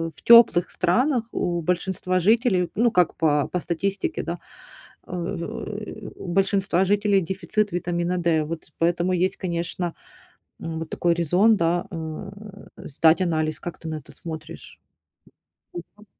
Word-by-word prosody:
в 140 - -17
тёплых 230 -7 +7
странах 235 - +1
у 175 -1 -1
большинства 185 +2 -1
жителей, 195 -2 +2
ну, 235 +4 +3
как 180 -2 +3
по 150 -3 +2
по 180 - 0
статистике, 190 +4 -2
да, 170 +1 -4 0.7
а, - - -9
в, 170 0 -3
э, 215 0 -6
у - - -9
большинства 195 0 +1
жителей 205 0 +2
дефицит 195 +4 -1
витамина 175 0 -1
D. 165 -3 +2
Вот 165 0 -6
поэтому 175 +2 +1
есть, 190 - -3
конечно, 175 0 -3 0.8
м, 160 -1 -4
вот 160 - -6
такой 170 -1 +1
резон, 180 +7 +3
да, 170 0 +1
э, 165 +4 -6 0.5
сдать 160 +5 +3
анализ. 155 -3 0
Как 175 - -7
ты 165 - -9
на 155 - -3
это 145 - -16
смотришь? 160 +1 -9 1.2
Мгм. 210 0 -18
175 Hz, 145 wpm, -24 LUFS, 165-195 Hz, 1.2 s, тёплых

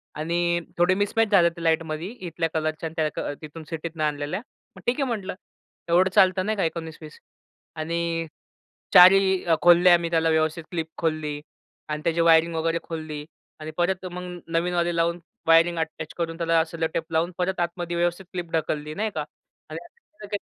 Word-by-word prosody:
आणि 170 +2 0 0.2
थोडे 175 +2 +4
मिसमॅच 205 +3 +1
झाले 175 -4 +6
ते 170 0 -10
लाईटमध्ये 160 0 0
इथल्या 175 -8 -4
कलरच्या 155 0 -2
आणि 160 - -16 0.2
त्या - - -4
अ, - - -3
तिथून 155 +1 -9
सिटीतनं 165 -1 -4
आणलेल्या, 150 +5 -2 0.3
मग - - -13
ठीक 240 - +3
आहे 275 - +1
म्हटलं, 205 -6 -3 0.5
एवढं 180 +2 +4
चालतं 185 0 +4
नाही 215 +1 0
का? 195 - +1
19-20 160 -2 -5 0.6
आणि 165 +1 -2 0.7
4 180 +1 +10
ही 190 -1 +3
अ, 165 -2 +4
खोलल्या 175 +1 +7
अ, - - +7
मी 170 -1 -3
त्याला 165 -1 +2
व्यवस्थित 160 +1 +1
क्लिप 165 -3 -2
खोलली 155 -2 -2 0.5
आणि 150 0 -3
त्याची 170 0 +1
वायरिंग 165 0 +4
वगैरे 165 +1 0
खोलली 155 -2 -6 0.3
आणि 155 0 -6
परत 185 +2 0
मग 180 0 -7
नवीनवाले 175 0 +1
लावून 170 +1 +1 0.3
वायरिंग 165 +1 +5
अटॅच 160 -1 -4
करून 165 -1 -3
त्याला 165 -1 +2
सेलो 165 0 -2
टेप 165 +1 -3
लावून, 165 +2 +1
परत 185 +1 -1
आतमध्ये 175 0 -2
व्यवस्थित 175 +2 0
क्लिप 175 -2 -5
ढकलली. 155 -1 -2
नाही 215 +2 -1
का? - - -1 0.5
आणि - - -6
नंतर 345 - -16
ते 205 - 0
170 Hz, 180 wpm, -25 LUFS, 160-180 Hz, 0.7 s, 4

